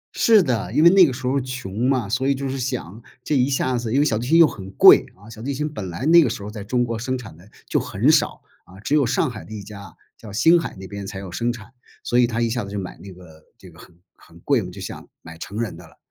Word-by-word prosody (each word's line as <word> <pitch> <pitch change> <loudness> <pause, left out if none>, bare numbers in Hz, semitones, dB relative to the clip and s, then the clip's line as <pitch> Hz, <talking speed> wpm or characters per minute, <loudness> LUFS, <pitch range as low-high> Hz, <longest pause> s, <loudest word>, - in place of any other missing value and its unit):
是 220 -5 +5
的， 120 -7 -2
因 155 - +2
为 170 - +8
那 190 -2 +7
个 - - -2
时 130 +1 -7
候 135 +2 +1
穷 125 -2 -3
嘛， 130 -6 0
所 125 +6 -1
以 140 - +2
就 135 +1 -4
是 135 0 -4
想， 120 -5 -5 0.2
这 150 - -1
一 130 +1 +2
下 130 -1 0
子 115 -2 -4
因 135 - +2
为 145 - +3
小 110 -6 0
提 120 - -5
琴 165 +3 +4
又 170 - +8
很 95 -10 -6
贵， - - +8
啊， 100 +4 -18
小 110 -1 -11
提 135 +3 -3
琴 150 +2 -2
本 95 -9 -6
来 90 +11 -5
那 170 +1 +7
个 140 - +1
时 105 -2 -6
候 105 - -7
在 105 -2 -8
中 120 +4 0
国 115 -1 -4
生 130 +2 -2
产 115 -9 -11
的 90 +6 -18 0.2
就 - - +1
很 - - +1
少。 - - +1 0.2
啊， 95 +2 -16
只 140 +8 -1
有 145 -4 +3
上 130 +5 0
海 110 -3 -9
的 - - -15
一 105 - -6
家， 100 -3 -11 0.2
叫 105 -3 -11
星 165 - +4
海 165 - -4
那 95 - -9
边 100 0 -7
才 95 0 -7
有 95 -1 -8
生 120 +3 -1
产， 120 0 -11 0.3
所 120 - -1
以 125 - +5
他 115 -1 -3
一 115 -1 +1
下 120 0 -2
子 100 - -9
就 100 - -3
买 95 - -7
那 100 - -12
个 85 -4 -16
这 - - -15
个 - - -19
很 85 - -17 0.2
很 85 0 -19
贵 135 +6 +1
嘛， 90 - -7
就 95 - -11
想 95 - -8
买 80 0 -12
成 100 +6 -7
人 115 -7 -3
的 85 +1 -13
了。 80 - -21
115 Hz, 320 characters per minute, -22 LUFS, 100-130 Hz, 0.3 s, 为